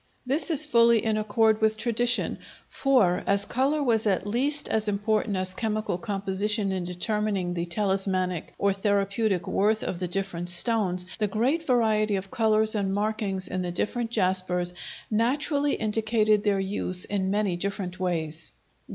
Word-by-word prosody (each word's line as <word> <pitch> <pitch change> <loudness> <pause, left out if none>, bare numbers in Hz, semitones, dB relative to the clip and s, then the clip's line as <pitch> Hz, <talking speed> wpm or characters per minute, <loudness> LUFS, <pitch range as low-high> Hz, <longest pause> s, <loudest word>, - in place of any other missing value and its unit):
This 275 +8 +2
is 310 -2 +5
fully 235 -5 +4
in 220 -1 +1
accord 215 +1 +1
with 220 0 +2
tradition, 240 +2 0 0.3
for, 230 -11 +2
as 200 0 +2
color 280 +6 0
was 225 -4 +1
at 190 -1 +1
least 270 +8 0
as 220 -1 +1
important 210 0 0
as 185 0 0
chemical 215 -3 -2
composition 200 -1 -1
in 185 -2 -3
determining 195 0 -2
the 170 0 -3
talismanic 185 -2 -1
or 200 -1 +1
therapeutic 200 -1 0
worth 215 +2 +1
of 175 - -4
the 180 - -2
different 180 -2 -2
stones, 185 -1 +2
the 210 - +1
great 260 +11 -1
variety 220 -4 +2
of 195 0 -5
colors 220 -1 +2
and 195 -2 -1
markings 205 -2 -1
in 185 - -3
the 180 -1 -3
different 225 +6 -2
jaspers 185 -4 0 0.4
naturally 280 +6 +1
indicated 215 -1 +1
their 200 -2 +1
use 190 -2 -1
in 195 -2 -2
many 200 -2 0
different 185 0 -4
ways. 165 -4 -3
210 Hz, 150 wpm, -26 LUFS, 190-225 Hz, 0.4 s, is